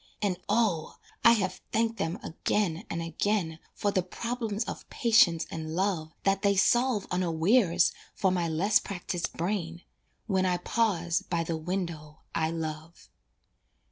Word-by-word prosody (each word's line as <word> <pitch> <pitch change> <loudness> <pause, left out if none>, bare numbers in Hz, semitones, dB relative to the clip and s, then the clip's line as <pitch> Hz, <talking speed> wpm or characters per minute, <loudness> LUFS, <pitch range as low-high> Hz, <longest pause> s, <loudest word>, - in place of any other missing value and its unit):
And 190 -4 -1
O! 205 -7 +1 0.3
I 230 +1 +8
have 185 -5 -1
thanked 225 +1 +1
them 165 +4 -2
again 180 +1 -1
and 170 0 -3
again 165 0 -1 0.2
For 205 - 0
the 185 - +2
problems 225 +3 -3
of - - -7
patience 195 -8 +4
and 160 0 -5
love 180 -4 0
That 195 0 +2
they 200 -1 +3
solve 240 +2 +3
unawares 180 +1 +3 0.2
for 190 - +2
my 175 -2 0
less 185 +7 +3
practiced 180 -2 -4
brain 170 -1 -2 0.4
When 190 -2 +1
I 180 -1 +2
pause 175 -4 0
by 170 -1 -1
the 165 0 -2
window 160 -3 -4
I 160 -1 +1
love. 160 0 -6
180 Hz, 140 wpm, -29 LUFS, 165-205 Hz, 0.4 s, I